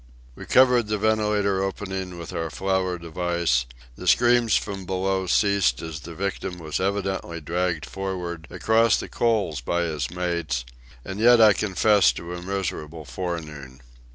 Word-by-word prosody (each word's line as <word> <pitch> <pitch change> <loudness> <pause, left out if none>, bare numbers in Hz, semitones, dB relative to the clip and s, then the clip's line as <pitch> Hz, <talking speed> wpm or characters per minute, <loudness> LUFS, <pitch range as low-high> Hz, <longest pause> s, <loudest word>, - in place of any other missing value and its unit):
We - - -11
covered 125 -3 +5
the 105 0 0
ventilator 105 -2 +1
opening 95 -2 -4
with 85 -1 -8
our 80 0 -2
flour 95 -1 -1
device; 85 -6 -1 0.3
the - - -8
screams 120 -2 +4
from 100 -1 -2
below 95 +1 -1
ceased 100 - +2
as 80 -2 -6
the 85 +3 -10
victim 95 -1 -3
was 80 -3 -4
evidently 95 -3 -2
dragged 85 0 -2
for'ard 90 -3 -5
across 115 0 +3
the - - -5
coal 110 -9 0
by 85 +7 0
his 75 -6 -2
mates; 85 -8 -2 0.4
and 95 +1 -6
yet 120 +1 +6
I 110 -2 +8
confess 105 0 +3
to 85 +1 -7
a 90 - -6
miserable 85 -5 -4
forenoon. 75 -3 -6
90 Hz, 150 wpm, -24 LUFS, 85-100 Hz, 0.4 s, I